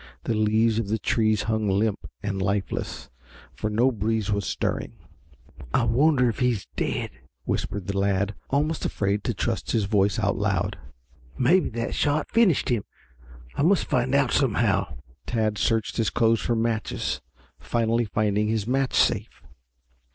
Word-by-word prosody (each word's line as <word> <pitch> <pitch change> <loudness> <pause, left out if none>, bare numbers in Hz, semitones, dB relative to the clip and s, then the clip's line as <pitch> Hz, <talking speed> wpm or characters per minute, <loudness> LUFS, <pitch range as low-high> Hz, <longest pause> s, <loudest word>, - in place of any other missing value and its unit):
The 115 - -1
leaves 110 +1 +2
of 115 - -2
the 110 +2 0
trees 110 -1 +1
hung 110 -2 0
limp 100 +2 0
and 100 -1 -2
lifeless, 95 -8 -2 0.4
for 110 - -3
no 120 +5 +3
breeze 110 -1 -1
was 100 -3 -1
stirring. - - -2 0.8
"I - - +3
wonder 125 +3 +3
if 115 - -2
he's 125 -5 +1
dead," - - -2 0.3
whispered 100 -2 -3
the 100 0 -2
lad, 100 +1 +1 0.2
almost 150 +3 0
afraid 100 0 -1
to 120 - -1
trust 115 +3 -2
his 110 -3 +2
voice 100 -2 +2
out - - +1
loud. - - -1 0.6
"Maybe 175 +9 +3
that 115 - -2
shot 145 +1 0
finished 220 - +3
him. 120 -5 +1 0.7
I - - -2
must 180 +5 +3
find 125 +2 +1
out 140 -3 +3
somehow." 100 - +1 0.3
Tad 110 -3 0
searched 110 +1 0
his 115 -2 +1
clothes 115 -1 +2
for 120 - 0
matches, 115 -1 -1 0.4
finally 115 0 0
finding 105 0 0
his 110 -2 0
match 130 +2 0
safe. - - +1
110 Hz, 150 wpm, -25 LUFS, 100-120 Hz, 0.8 s, no